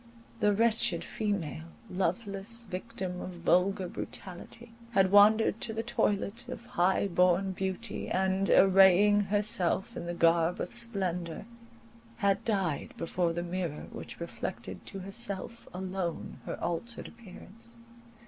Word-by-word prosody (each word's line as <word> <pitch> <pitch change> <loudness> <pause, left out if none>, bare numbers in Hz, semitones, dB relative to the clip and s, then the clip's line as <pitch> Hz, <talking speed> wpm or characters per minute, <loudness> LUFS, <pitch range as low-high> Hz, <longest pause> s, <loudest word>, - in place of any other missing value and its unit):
The 210 -2 +4
wretched 220 -6 +2
female, 185 - -3 0.2
loveless 200 +5 -2
victim 185 -2 -5
of 185 - -6
vulgar 180 +2 +2
brutality, 195 +7 -8 0.2
had 190 -2 +4
wandered 215 +2 +6
to 225 - -3
the 225 +1 -2
toilet 225 0 -1
of 245 -2 -7
high 190 +1 +2
born 180 +1 +3
beauty, 190 0 -4
and, 190 +1 +1
arraying 195 +2 +6
herself 205 0 0
in 170 - -5
the 175 - -3
garb 170 +1 +3
of - - -3
splendour, 190 -8 -2 0.7
had 200 -2 +1
died 190 -9 -1
before 170 0 0
the 170 +1 -3
mirror 175 -3 -3
which - - -8
reflected - - -6
to 195 -2 -6
herself 200 +2 -4
alone 185 -2 -4
her - - -4
altered 235 +8 -3
appearance. 230 +1 -12
195 Hz, 125 wpm, -30 LUFS, 180-215 Hz, 0.7 s, wandered